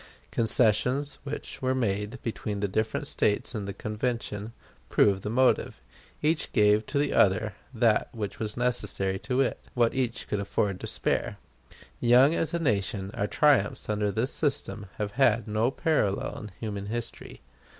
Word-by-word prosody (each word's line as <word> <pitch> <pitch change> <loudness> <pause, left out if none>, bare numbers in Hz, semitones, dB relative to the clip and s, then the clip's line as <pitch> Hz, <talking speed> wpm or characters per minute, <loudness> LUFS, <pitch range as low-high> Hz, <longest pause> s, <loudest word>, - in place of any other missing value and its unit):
Concessions 125 +5 +1
which 145 +1 -6
were 130 0 +1
made 105 -1 -1
between 105 -3 -3
the 100 - 0
different 110 +3 -1
States 105 +4 0
in 105 -4 -3
the 100 - -4 0.2
Convention 110 -1 -3 0.4
prove 100 -2 +3
the 105 - -4
motive. 130 +3 +2 0.4
Each 155 0 +1
gave 105 +1 +4
to 145 - -2
the 145 - +1
other 105 +2 +3 0.2
what 110 -3 0
was 105 0 -3
necessary 105 -6 -1
to 130 +4 0
it; 130 - 0 0.2
what 120 -2 +3
each 125 -3 -2
could 105 - -1
afford 100 -1 -1
to - - -5
spare. - - -1 0.6
Young 125 +5 +6
as 165 - 0
a 170 - 0
nation, 100 - -1
our 100 - -1
triumphs 130 -6 +2
under 105 -1 0
this 115 +7 0
system 105 -9 -2
have 105 -1 -2
had 120 -3 +4
no 110 +3 +1
parallel 135 -9 0
in 105 - -8
human 100 -3 -4
history. 120 +2 -6
110 Hz, 155 wpm, -28 LUFS, 105-125 Hz, 0.6 s, Young